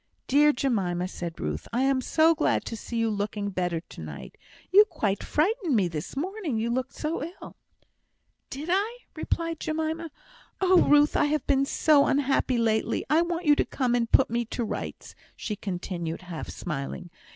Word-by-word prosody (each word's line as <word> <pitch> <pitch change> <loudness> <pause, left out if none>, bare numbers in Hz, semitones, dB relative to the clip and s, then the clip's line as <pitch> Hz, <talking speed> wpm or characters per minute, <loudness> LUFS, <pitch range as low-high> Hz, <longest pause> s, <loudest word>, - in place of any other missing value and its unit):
"Dear 295 +2 +5
Jemima!" 190 -10 -1
said 170 -3 -6
Ruth, 75 0 -4
"I 245 +3 +1
am 270 -1 +2
so 320 +5 +4
glad 315 - 0
to 230 - -4
see 230 +2 -6
you 230 -1 +1
looking 205 0 -3
better 180 -3 -1
to - - -12
night! - - -8 0.4
You 405 +3 +9
quite 205 - -2
frightened 350 - +1
me 195 -5 +3
this 160 - -6
morning, 355 - -2
you 230 +2 -1
looked 260 +2 -2
so 310 +2 -3
ill." 340 +4 -9 0.9
"Did 295 +5 -6
I?" 415 +6 +1 0.2
replied 330 0 -2
Jemima. 320 +1 -2 0.5
"Oh, 370 -1 +5
Ruth! 295 0 +4
I - - +4
have 300 +1 0
been 275 0 +2
so 295 -1 +4
unhappy 270 -2 +1
lately. 220 -2 0
I 315 +2 +5
want 345 0 -2
you 295 -1 +6
to - - +3
come 255 -3 -1
and 235 -1 0
put 265 -3 +4
me 235 0 +1
to 235 +2 -3
rights," - - -6 0.2
she 210 - -4
continued, 175 -3 -4
half 175 -3 -7
smiling. 170 +2 -5
260 Hz, 175 wpm, -27 LUFS, 200-315 Hz, 0.9 s, You